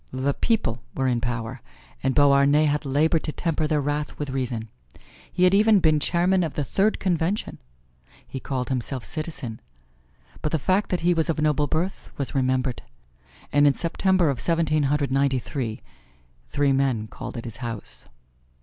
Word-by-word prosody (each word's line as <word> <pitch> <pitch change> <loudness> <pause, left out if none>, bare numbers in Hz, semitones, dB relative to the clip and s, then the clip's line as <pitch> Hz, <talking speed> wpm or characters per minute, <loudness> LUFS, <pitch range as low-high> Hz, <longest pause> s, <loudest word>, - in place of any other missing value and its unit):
The 130 +2 0
people 125 - 0
were 135 - 0
in 120 -2 +1
power 120 +1 -3 0.4
and 130 0 0
Beauharnais 145 +1 +5
had 150 0 0
labored 155 +4 +2
to 155 - -2
temper 160 -1 -1
their 150 -1 +1
wrath 145 +1 -2
with 145 -2 -4
reason. 125 -4 -3 0.6
He 180 - 0
had 180 +1 +5
even 210 +1 +5
been 155 -3 +3
Chairman 180 +4 +2
of 160 - -3
the 145 - -1
Third 200 +9 +1
Convention. 180 +2 -1 0.7
He 135 - -6
called 130 -2 -3
himself 130 -1 -2
Citizen. 150 -8 -5 0.8
But 150 - -2
the - - +3
fact 190 +7 +1
that 180 - -1
he 175 +1 +3
was 165 -1 +1
of 160 - 0
noble 150 -1 +2
birth 170 +6 -2
was 140 -3 -3
remembered, 130 -1 0 0.7
and 145 0 +5
in 140 - +3
September 175 -1 +2
of 130 - -3
Seventeen 155 -3 +2
Hundred 145 -2 0
Ninety 135 0 +2
three, 120 -3 -4 0.6
three 140 - +1
men 135 -5 +1
called 120 - -8
at 115 - -6
his 115 - -6
house. 115 -4 -7
145 Hz, 170 wpm, -24 LUFS, 130-165 Hz, 0.8 s, Beauharnais